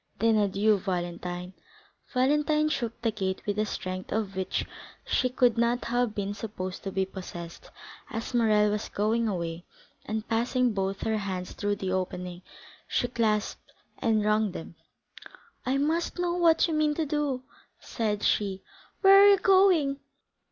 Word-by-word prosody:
"Then 225 +1 +3
adieu, 205 +1 +2
Valentine!" 180 0 -4 0.6
Valentine 300 +4 +2
shook 235 -7 -3
the 225 - +2
gate 190 -3 -3
with 205 0 -1
a 215 - +1
strength 185 -1 -5
of 210 -3 -2
which 190 0 -2 0.4
she 255 - +1
could 245 -2 +2
not 235 +1 +1
have 240 -2 0
been 200 0 -2
supposed 185 -4 -6
to 195 - -2
be 190 0 0
possessed, 175 -3 -9 0.4
as 225 +2 -5
Morrel 215 -3 +3
was 210 0 -3
going 225 +3 0
away, 170 -4 -3 0.4
and 215 0 -4
passing 240 +1 +1
both 195 0 -2
her 220 -1 0
hands 185 -2 -4
through 205 0 -1
the 190 -2 -3
opening, 180 -1 -3 0.5
she 245 - 0
clasped 220 -3 -1 0.3
and 220 -3 +1
wrung 210 -2 +2
them. 165 - -8 0.9
"I 265 +2 +2
must 320 +6 0
know 355 -1 0
what 340 -2 +4
you 330 - -2
mean 305 -1 +2
to 320 - 0
do!" 290 -3 -1 0.4
said 210 -3 -2
she. 195 -2 0 0.4
"Where 390 0 +8
are 405 - +8
you 400 - +6
going?" 365 -8 +4
215 Hz, 155 wpm, -28 LUFS, 190-255 Hz, 0.9 s, Where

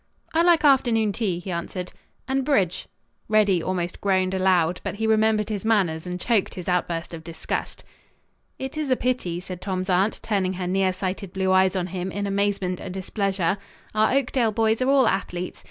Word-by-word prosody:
"I 325 - +4
like 340 -3 +4
afternoon 235 -6 +4
tea," 200 -5 -1
he 180 +2 -6
answered, 180 +1 -4 0.3
"and 270 0 0
bridge." 200 - +1 0.4
Reddy 205 -5 +3
almost 175 0 -3
groaned 190 -1 +1
aloud, 180 -2 +2
but - - -3
he 220 +2 -2
remembered 220 -1 +2
his 205 -3 -3
manners 185 -7 +1
and 180 0 -4
choked 220 -1 0
his 180 - -7
outburst 170 -2 -1
of 160 -1 -7
disgust. 165 0 -4 0.7
"It 265 +3 -6
is 300 -3 -2
a 255 - +4
pity," 240 -10 -1
said 180 0 -8
Tom's 185 -1 -2
aunt, 190 +4 +2
turning 195 -4 0
her 185 0 -4
nearsighted 185 0 -1
blue 190 -1 0
eyes 190 0 +4
on 180 -2 0
him 185 +1 -4
in 205 +1 -3
amazement 200 -2 0
and 185 - -6
displeasure. 190 -1 -1 0.3
"Our 215 +4 +3
Oakdale 255 -4 +1
boys 220 +2 +1
are 255 - +2
all 275 -2 +5
athletes. 180 -2 -2
195 Hz, 180 wpm, -24 LUFS, 180-220 Hz, 0.7 s, all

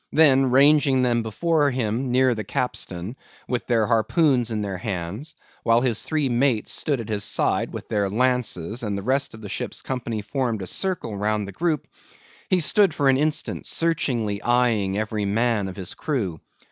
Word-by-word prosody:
Then 135 -4 +5
ranging 140 0 +5
them 120 -1 +2
before 145 +7 +1
him 125 0 -1
near 130 0 +3
the 110 -2 -4
capstan, 100 -2 -3 0.3
with 125 -1 -2
their 115 -3 +2
harpoons 120 - +2
in 110 -2 -2
their 95 -2 -4
hands, 100 - -5 0.3
while 115 +1 +3
his 120 -4 0
three 155 -3 0
mates 120 -2 +1
stood 145 -5 -1
at 115 - -6
his 105 -2 -1
side - - 0
with - - -7
their 100 -2 0
lances, 120 -3 0
and 105 -3 -2
the 100 - -5
rest 135 +2 0
of 110 - -13
the - - -6
ship's - - -4
company 120 -5 -3
formed 115 -3 -2
a - - -4
circle 180 - -3
round 105 0 -1
the - - -7
group; 160 - -1 0.6
he 185 - +3
stood 195 +1 +3
for 140 -2 +2
an 130 - +4
instant 150 +2 -2
searchingly 120 -11 0
eyeing 115 -6 +2
every 110 -1 -2
man 110 0 +1
of 95 - -7
his 95 -2 -5
crew. 100 - -3
120 Hz, 180 wpm, -23 LUFS, 105-135 Hz, 0.6 s, Then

